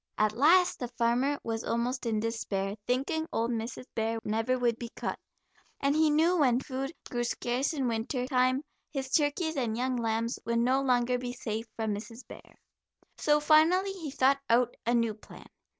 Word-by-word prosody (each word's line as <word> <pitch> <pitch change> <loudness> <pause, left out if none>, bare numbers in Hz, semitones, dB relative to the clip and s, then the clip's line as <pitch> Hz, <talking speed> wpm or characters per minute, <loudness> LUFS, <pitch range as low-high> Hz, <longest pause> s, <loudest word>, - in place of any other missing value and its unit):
At 215 0 +3
last 335 +9 +4
the 245 - -3
farmer 245 +4 +1
was 225 0 -3
almost 240 +2 -1
in 220 -2 0
despair, 205 -3 -2
thinking 275 +6 0
old 230 +1 0
Mrs. 230 +2 -4
Bear 225 0 -1
never 225 +4 0
would 240 -2 0
be 235 - -5
caught, - - -4 0.6
and 280 +1 +1
he 315 0 +4
knew 325 +4 +3
when 255 -4 +4
food 270 +1 -4 0.2
grew 240 -1 -2
scarce 245 +4 -1
in 275 -5 -1
winter 235 +2 -2
time 255 +1 +2 0.3
his 270 -3 -4
turkeys 315 +3 +1
and 230 -4 -1
young 255 +1 0
lambs 230 0 -1
would 235 0 -1
no 255 +3 +3
longer 250 -1 +2
be 245 0 -4
safe 225 -2 -4
from 220 -2 -1
Mrs. 225 +4 -8
Bear. - - -13 0.6
So 295 0 +3
finally 325 +6 +4
he 350 -6 -6
thought 270 +1 +3
out 240 +1 +3
a 240 - +3
new 230 -2 +1
plan. 210 - -14
250 Hz, 180 wpm, -29 LUFS, 230-275 Hz, 0.6 s, last